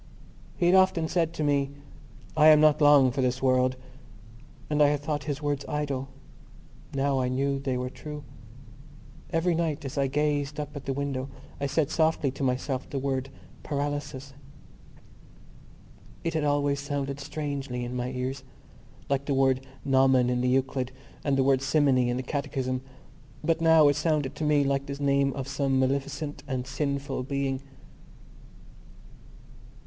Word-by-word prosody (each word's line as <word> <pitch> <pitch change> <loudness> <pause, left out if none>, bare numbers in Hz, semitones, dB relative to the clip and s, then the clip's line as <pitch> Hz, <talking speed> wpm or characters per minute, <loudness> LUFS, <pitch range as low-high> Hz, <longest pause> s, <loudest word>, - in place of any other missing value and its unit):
He 175 - +1
had 175 - +5
often 185 -4 +4
said 165 -1 +1
to 155 - -3
me: 140 -2 +2 0.7
"I 155 0 +6
am 155 -1 +8
not 155 0 +4
long 145 -3 +6
for 135 +2 -1
this 130 0 0
world," 130 -1 +2 0.9
and 150 0 +1
I 145 - +7
had 145 0 0
thought 145 -1 -3
his 145 -1 -3
words 145 -1 -1
idle. 140 -3 -2 0.8
Now 135 0 +1
I 125 - +1
knew 135 +2 0
they 135 -2 -2
were 125 0 -3
true. 150 0 -8 1.1
Every 165 +2 +1
night 160 -3 -1
as 135 +1 -3
I 135 - +2
gazed 145 +1 -1
up 150 0 -5
at 140 - -7
the 135 - -1
window 135 -1 -3 0.3
I 140 - -1
said 145 +1 0
softly 160 -4 +2
to 135 - -10
myself 130 0 -1
the 140 - -4
word 135 0 -2 0.3
paralysis. 145 -2 -4 1.9
It 165 - -1
had 155 -2 0
always 145 -1 +1
sounded 140 -1 -3
strangely 140 -4 -4
in 125 +1 -5
my 125 0 -2
ears, 130 +1 -4 0.6
like 140 0 0
the 140 - 0
word 135 0 +2 0.2
gnomon 130 -2 +4
in 125 0 0
the 125 - +1
Euclid 130 0 0 0.3
and 140 -2 +1
the 135 - +3
word 135 -1 +3
simony 135 -3 +3
in 120 - -1
the 130 - -3
Catechism. 130 -2 -2 0.6
But 165 -1 +1
now 160 -2 +6
it 145 - +3
sounded 150 -2 0
to 150 - -5
me 150 -1 +3
like 140 0 0
the 140 - -4
name 140 -1 +2
of 135 -2 -5
some 140 -1 0
maleficent 140 +2 -1
and 130 -2 -2
sinful 140 0 -2
being. 135 0 -2
140 Hz, 160 wpm, -27 LUFS, 130-150 Hz, 1.9 s, am